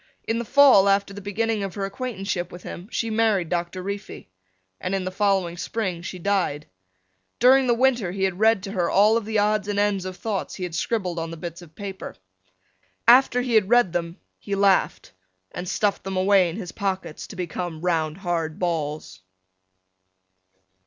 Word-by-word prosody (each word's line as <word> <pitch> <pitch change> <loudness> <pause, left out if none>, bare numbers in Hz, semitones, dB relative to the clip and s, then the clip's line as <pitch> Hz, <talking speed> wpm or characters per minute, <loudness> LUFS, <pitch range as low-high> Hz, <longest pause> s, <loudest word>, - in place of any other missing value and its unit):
In 225 +1 0
the 235 - -4
fall 260 -6 +6
after 200 0 +1
the 205 - -8
beginning 215 +2 -1
of 195 -2 -4
her 200 -2 -2
acquaintanceship 195 -4 -4
with 175 - -10
him 180 +5 -8
she 230 -1 -2
married 215 -6 +1
Doctor 175 +1 -3
Reefy 200 - -6 0.5
and 185 +1 -2
in 190 - -2
the 185 - -3
following 190 -3 0
spring 185 -3 -3
she 185 +1 -6
died. 180 -6 -1 0.7
During 260 +2 +5
the 240 - +3
winter 240 -7 +2
he 190 +1 0
read 195 +2 +2
to 195 - -5
her 180 -4 0
all 210 +3 +4
of 230 -2 -1
the 220 0 -1
odds 210 0 +1
and 205 -1 -2
ends 205 -2 +1
of 185 -1 -6
thoughts 210 -3 -3
he 185 - -6
had 180 -2 -4
scribbled 180 -1 -2
on 165 0 -4
the 165 - -7
bits 170 +1 -7
of 160 -3 -15
paper. 195 -1 -7 0.9
After 250 +1 +6
he 245 -1 -2
had 210 -3 +4
read 240 -7 +4
them 170 0 -3 0.2
he 200 - -3
laughed 195 -1 +2 0.4
and 180 0 -6
stuffed 205 0 0
them 190 -1 -4
away 190 -1 +4
in 165 - -6
his 195 -5 -6
pockets 190 -5 -4
to - - -10
become 175 -2 -5
round 165 -3 0
hard 170 -4 -2
balls. 155 - -3
195 Hz, 185 wpm, -24 LUFS, 175-210 Hz, 0.9 s, fall